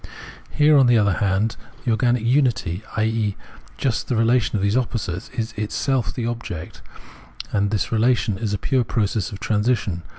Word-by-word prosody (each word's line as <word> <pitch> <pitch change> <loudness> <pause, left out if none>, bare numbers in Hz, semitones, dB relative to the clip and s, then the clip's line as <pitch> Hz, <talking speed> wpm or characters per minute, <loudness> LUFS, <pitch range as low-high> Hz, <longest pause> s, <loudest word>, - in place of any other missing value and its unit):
Here, 150 0 +4
on 130 - +5
the 120 -1 +5
other 100 -3 +3
hand, 105 +4 0 0.3
the 120 - +2
organic 120 +1 +2
unity, 120 - +1 0.2
i.e. 110 -2 0 0.4
just 130 -4 -1
the 125 - 0
relation 115 +1 +2
of 100 - 0
those 100 +2 +1
opposites, 115 -8 -2
is 115 0 -2
itself 120 +4 -1
the 120 - -4
object; 115 -9 -5 0.7
and 100 -1 +1
this 105 -2 -1
relation 110 -3 +1
is 110 -3 -2
a 105 - 0
pure 130 +4 +1
process 105 -2 -1
of 100 - -8
transition. 105 -5 0
110 Hz, 165 wpm, -22 LUFS, 100-120 Hz, 0.7 s, on